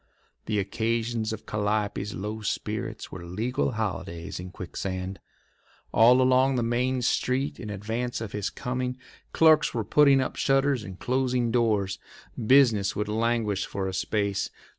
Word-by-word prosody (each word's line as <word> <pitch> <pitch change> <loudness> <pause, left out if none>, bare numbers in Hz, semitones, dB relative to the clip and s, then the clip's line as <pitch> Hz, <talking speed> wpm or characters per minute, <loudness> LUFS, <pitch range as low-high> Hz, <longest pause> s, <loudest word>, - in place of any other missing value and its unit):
The 105 - 0
occasions 115 +2 -1
of 110 - -6
Calliope's 105 0 -1
low 105 +3 -4
spirits 105 - -4
were 95 - -7
legal 110 +9 -1
holidays 95 -5 -4
in 90 +1 -7
Quicksand. 95 0 -5 0.7
All 125 +3 +6
along 130 +1 +4
the 120 - +1
main 125 +2 0
street 130 +3 0
in 110 - -6
advance 110 +5 -3
of 110 -3 -5
his 105 -2 -2
coming 125 0 -3 0.3
clerks 155 -4 +4
were 115 - 0
putting 140 +4 +5
up 130 - -2
shutters 135 -2 +2
and 95 -3 -8
closing 125 -1 0
doors. 105 -5 +1 0.4
Business 115 -5 +4
would 105 0 -2
languish 110 -2 0
for 95 -1 -3
a 95 - -4
space. 100 +1 -1
110 Hz, 140 wpm, -27 LUFS, 100-125 Hz, 0.7 s, All